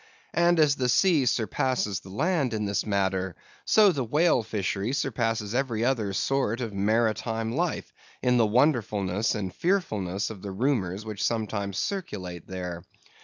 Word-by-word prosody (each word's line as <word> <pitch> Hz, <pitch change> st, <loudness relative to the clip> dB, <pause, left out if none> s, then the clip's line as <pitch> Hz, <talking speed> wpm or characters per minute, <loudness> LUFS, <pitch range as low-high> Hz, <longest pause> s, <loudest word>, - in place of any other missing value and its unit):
And 170 Hz, 0 st, +3 dB
as 145 Hz, -2 st, +4 dB
the 125 Hz, -1 st, 0 dB
sea 155 Hz, -2 st, +4 dB
surpasses 115 Hz, -2 st, 0 dB
the 95 Hz, -, -14 dB
land 140 Hz, -, 0 dB
in 105 Hz, -1 st, -1 dB
this 100 Hz, +1 st, -1 dB
matter, 95 Hz, -2 st, 0 dB, 0.3 s
so 210 Hz, -3 st, +6 dB
the 140 Hz, -6 st, -2 dB
whale 150 Hz, +3 st, +3 dB
fishery 105 Hz, +1 st, -2 dB
surpasses 115 Hz, -6 st, -1 dB
every 120 Hz, -3 st, 0 dB
other 115 Hz, -6 st, 0 dB
sort 125 Hz, +2 st, 0 dB
of 115 Hz, -4 st, -4 dB
maritime 110 Hz, +2 st, 0 dB
life, 165 Hz, +6 st, -2 dB, 0.3 s
in 125 Hz, -1 st, +3 dB
the 115 Hz, -2 st, +4 dB
wonderfulness 110 Hz, -, +1 dB
and 95 Hz, -4 st, -4 dB
fearfulness 105 Hz, -, -1 dB
of 100 Hz, -4 st, -10 dB
the 100 Hz, -, -6 dB
rumors 100 Hz, -3 st, -1 dB
which 105 Hz, -2 st, -4 dB
sometimes 105 Hz, -4 st, -1 dB
circulate 95 Hz, -, -4 dB
there. 90 Hz, -2 st, -5 dB
110 Hz, 150 wpm, -27 LUFS, 100-135 Hz, 0.3 s, so